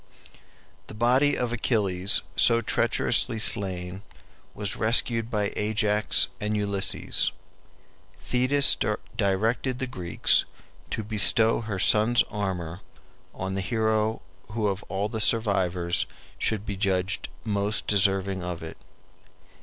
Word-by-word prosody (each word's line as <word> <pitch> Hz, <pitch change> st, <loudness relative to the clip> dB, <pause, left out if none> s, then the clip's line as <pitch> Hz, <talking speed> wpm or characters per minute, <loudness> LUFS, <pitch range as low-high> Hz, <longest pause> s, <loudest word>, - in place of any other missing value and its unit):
] -, -, -31 dB
The -, -, -10 dB
body 125 Hz, +6 st, +2 dB
of 120 Hz, -1 st, -2 dB
Achilles 100 Hz, -6 st, 0 dB
so 115 Hz, -, +4 dB
treacherously 110 Hz, 0 st, +1 dB
slain 95 Hz, -4 st, 0 dB, 0.5 s
was 100 Hz, -2 st, -3 dB
rescued 115 Hz, 0 st, +3 dB
by 105 Hz, -3 st, -1 dB
Ajax 105 Hz, 0 st, +2 dB
and 105 Hz, +1 st, -2 dB
Ulysses. 100 Hz, -1 st, 0 dB, 0.9 s
Thetis 130 Hz, +3 st, +3 dB, 0.4 s
directed 110 Hz, +5 st, 0 dB
the 130 Hz, -, -3 dB
Greeks 90 Hz, -9 st, 0 dB, 0.4 s
to 110 Hz, -, -3 dB
bestow 110 Hz, +2 st, +4 dB
her 105 Hz, -3 st, -4 dB
son's 110 Hz, +5 st, +3 dB
armor 95 Hz, -4 st, -4 dB, 0.5 s
on 95 Hz, +1 st, -4 dB
the 95 Hz, -, -2 dB
hero 110 Hz, +1 st, -1 dB, 0.3 s
who 110 Hz, -2 st, -1 dB
of 100 Hz, +1 st, -3 dB
all 100 Hz, +1 st, -2 dB
the 110 Hz, 0 st, -4 dB
survivors 95 Hz, -6 st, +1 dB, 0.3 s
should 105 Hz, -1 st, -2 dB
be 100 Hz, -3 st, -4 dB
judged 95 Hz, -1 st, -1 dB
most 105 Hz, -1 st, -1 dB
deserving 95 Hz, -2 st, +1 dB
of 90 Hz, -2 st, -5 dB
it. 80 Hz, -, -9 dB
105 Hz, 115 wpm, -26 LUFS, 95-115 Hz, 0.9 s, so